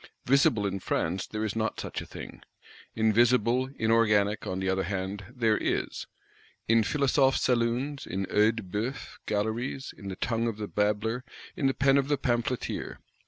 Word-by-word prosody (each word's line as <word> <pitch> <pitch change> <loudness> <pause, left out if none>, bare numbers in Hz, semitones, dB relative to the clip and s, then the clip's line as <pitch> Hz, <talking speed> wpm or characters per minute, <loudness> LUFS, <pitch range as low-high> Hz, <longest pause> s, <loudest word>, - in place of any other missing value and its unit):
Visible 125 -5 +3
in 100 -1 -2
France 90 +1 -1
there 110 0 -3
is 110 - -3
not 110 0 -1
such - - -4
a - - -9
thing. - - -9 0.5
Invisible, 120 +3 +3
inorganic, 110 -3 +2
on 95 - -2
the 95 - -2
other 95 0 +1
hand, 95 +1 -3
there 115 -4 +1
is: - - -2 0.6
in 115 0 +5
Philosophe 135 +1 +3
saloons, 125 +3 0
in 95 +2 -2
Œil 105 +4 +3
de 115 - -5
Bœuf 105 +8 -4
galleries; 115 +6 -2
in 100 - -10
the 95 - -4
tongue 115 +3 -1
of 115 -3 -3
the 105 -1 -4
babbler, 105 +4 0 0.3
in 150 -7 +1
the 135 - +1
pen 135 0 +4
of 135 - -1
the 145 0 +1
pamphleteer. 125 -1 -2
115 Hz, 165 wpm, -28 LUFS, 105-125 Hz, 0.6 s, in